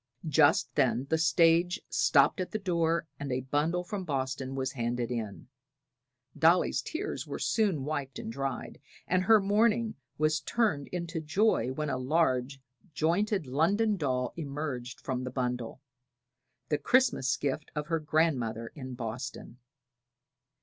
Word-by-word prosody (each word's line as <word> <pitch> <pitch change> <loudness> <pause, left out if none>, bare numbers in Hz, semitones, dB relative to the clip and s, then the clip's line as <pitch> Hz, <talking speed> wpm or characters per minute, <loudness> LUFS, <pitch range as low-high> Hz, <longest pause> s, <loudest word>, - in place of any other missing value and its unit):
Just 155 0 +4
then 130 -2 +2
the 160 - +4
stage 165 +3 +4
stopped - - +3
at 180 - -3
the - - -2
door 170 -4 0
and 140 -1 -4
a 125 +1 0
bundle 150 +7 0
from 195 +1 -4
Boston 135 -3 -3
was 135 0 -2
handed 120 -1 -2
in. 110 -4 -5 0.9
Dolly's 170 +3 +3
tears 395 +6 -4
were - - -4
soon 195 - +1
wiped 140 -3 -3
and - - -5
dried, 135 +1 -4 0.3
and 185 +1 +2
her 215 +3 +6
mourning 215 +3 +2 0.2
was 155 0 +2
turned 190 -12 0
into 170 -2 -4
joy 155 - +2
when 150 +2 -2
a 130 - -2
large 135 -2 +1 0.4
jointed 185 +4 +1
London 200 - +2
doll 130 -7 -1
emerged 140 -5 -5
from 130 -2 -3
the 130 - -3
bundle, 125 0 -3 0.9
the 150 - +1
Christmas 195 - +2
gift 145 +2 -2
of 150 -1 -2
her 165 +1 0
grandmother 130 -8 0
in 130 -3 -7
Boston. 120 +1 -6
150 Hz, 140 wpm, -30 LUFS, 130-175 Hz, 0.9 s, her